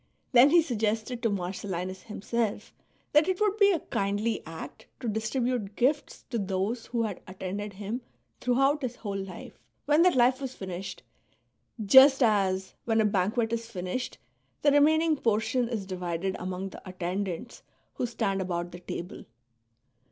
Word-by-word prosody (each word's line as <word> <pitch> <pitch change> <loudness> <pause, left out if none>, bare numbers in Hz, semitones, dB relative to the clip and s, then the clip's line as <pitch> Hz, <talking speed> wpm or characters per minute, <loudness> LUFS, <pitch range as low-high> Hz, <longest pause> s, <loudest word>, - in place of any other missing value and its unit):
Then 255 +2 +7
he 340 +1 +6
suggested 225 -2 -1
to 230 - +2
Marcellinus 185 -1 -3
himself 215 0 -3 0.4
that 300 +1 +5
it 375 -1 0
would 420 -1 +2
be 405 -1 +6
a 340 - 0
kindly 205 +3 -1
act 160 0 -9
to 245 - -5
distribute 220 -1 -1
gifts 280 +5 0
to 235 - 0
those 195 +4 -2
who 235 -2 -1
had 210 -5 -3
attended 190 +2 -5
him 210 +5 -4 0.4
throughout 270 +4 +2
his 250 -2 -3
whole 205 -4 -5
life, 195 -1 -7 0.3
when 295 +2 +4
that 360 -2 +5
life 255 +2 +4
was 260 -1 -5
finished, 190 0 -6 0.8
just 265 +5 +8
as, 190 -4 +1
when 225 -1 +2
a 220 - +4
banquet 215 +4 +1
is 230 0 -3
finished," 185 +4 -4 0.5
the 290 - +5
remaining 310 +2 +4
portion 230 +1 +1
is 220 -5 -3
divided 180 0 -3
among 185 +1 -4
the - - -11
attendants 185 +4 -4 0.3
who 245 - -2
stand 200 -5 -1
about 175 -1 -3
the 175 - -9
table. 175 0 -7
220 Hz, 150 wpm, -28 LUFS, 190-255 Hz, 0.8 s, just